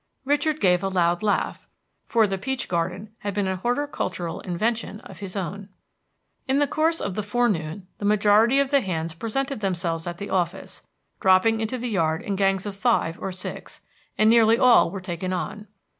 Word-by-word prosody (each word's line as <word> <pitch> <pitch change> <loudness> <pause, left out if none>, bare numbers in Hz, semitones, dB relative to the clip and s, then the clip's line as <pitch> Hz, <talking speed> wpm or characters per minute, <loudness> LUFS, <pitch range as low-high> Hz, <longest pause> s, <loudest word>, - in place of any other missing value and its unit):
Richard 290 +2 +1
gave 180 -2 +3
a 195 - -1
loud 175 -1 +1
laugh, 210 -1 -1 0.4
for 225 -2 +4
the 195 -2 -2
peach 265 +4 -2
garden 185 +4 -2
had 205 -1 -4
been 205 -2 0
a 190 0 -1
horticultural 190 - -2
invention 215 +4 -2
of - - -12
his 195 -2 -6
own. 195 +1 -5 0.8
In 265 +1 +2
the 290 - +4
course 320 +4 +1
of 200 - -3
the 210 - -2
forenoon 205 -6 -1
the 205 - -4
majority 210 +5 +4
of 280 0 +1
the 280 -1 +4
hands 165 -5 -3
presented 265 - -3
themselves 170 -4 -2
at 175 0 -4
the 200 - -6
office, 180 0 -2 0.4
dropping 190 +4 +4
into 220 +3 -2
the 245 +1 -4
yard 165 -7 0
in 200 - -2
gangs 195 0 +1
of 205 -1 -5
five 195 -6 +1
or 195 - -3
six, 185 0 -7 0.4
and 215 - +4
nearly 225 0 +6
all 250 -8 +6
were 195 +2 -6
taken 185 0 -4
on. 210 +3 -4
200 Hz, 185 wpm, -24 LUFS, 180-230 Hz, 0.8 s, nearly